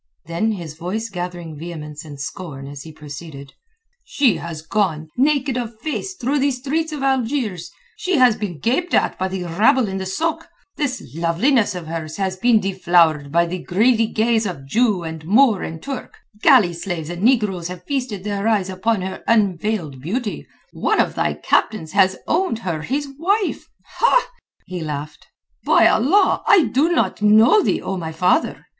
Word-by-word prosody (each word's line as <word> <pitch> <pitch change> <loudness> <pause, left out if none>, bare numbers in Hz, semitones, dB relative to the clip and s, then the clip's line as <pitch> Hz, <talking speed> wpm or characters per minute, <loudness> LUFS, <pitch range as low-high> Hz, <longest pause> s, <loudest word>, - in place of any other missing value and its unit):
Then 170 +7 -1
his 170 -6 -7
voice 190 +8 -4
gathering 175 -3 -6
vehemence 150 -3 -7
and 145 -3 -10
scorn 145 -3 -6
as 140 0 -8
he 160 - -10
proceeded: 145 -1 -10 0.5
"She 265 -7 +2
has 165 -2 -7
gone 160 -4 -1
naked 275 -1 +1
of 230 -2 -5
face 315 - -4
through 280 -2 -1
the 280 +1 +2
streets 290 +5 -2
of 295 -3 -5
Algiers; 245 - -1 0.3
she 370 0 -1
has 250 -4 +5
been 200 -7 -5
gaped 265 - 0
at - - +1
by 190 - 0
the 190 -1 -4
rabble 220 - +3
in 195 0 -3
the 190 - -4
sôk; 320 - -2 0.3
this 270 -4 -2
loveliness 195 - +2
of 175 -2 -6
hers 160 -1 -5
has 190 -2 -1
been 230 +3 +3
deflowered 175 -7 +2
by 170 +2 +3
the 180 +2 -4
greedy 225 +4 +2
gaze 225 0 +1
of 140 -8 -6
Jew 210 - +1
and 160 -1 -6
Moor 215 +3 +4
and 160 0 -5
Turk; 275 -2 -6 0.2
galley 240 - +5
slaves 170 -2 -5
and 175 0 -6
negroes 210 -7 +2
have 180 0 -8
feasted 245 -8 -3
their 205 0 -2
eyes 200 -4 +1
upon 190 +1 0
her 190 - -6
unveiled 195 - 0
beauty; 210 - -4 0.3
one - - 0
of - - +2
thy - - -1
captains 165 -8 0
hath 190 -1 +3
owned 350 -6 0
her 165 -4 -2
his 280 - -2
wife." 395 +4 0 1.0
He 180 -2 -6
laughed. 150 -1 -6 0.4
"By - - +4
Allah, 370 - +3
I 410 -7 +6
do 275 +7 +1
not 335 - 0
know 220 - +6
thee, - - 0
O 195 - -3
my 160 -2 -5
father! 180 - +1
195 Hz, 170 wpm, -20 LUFS, 170-250 Hz, 1.0 s, I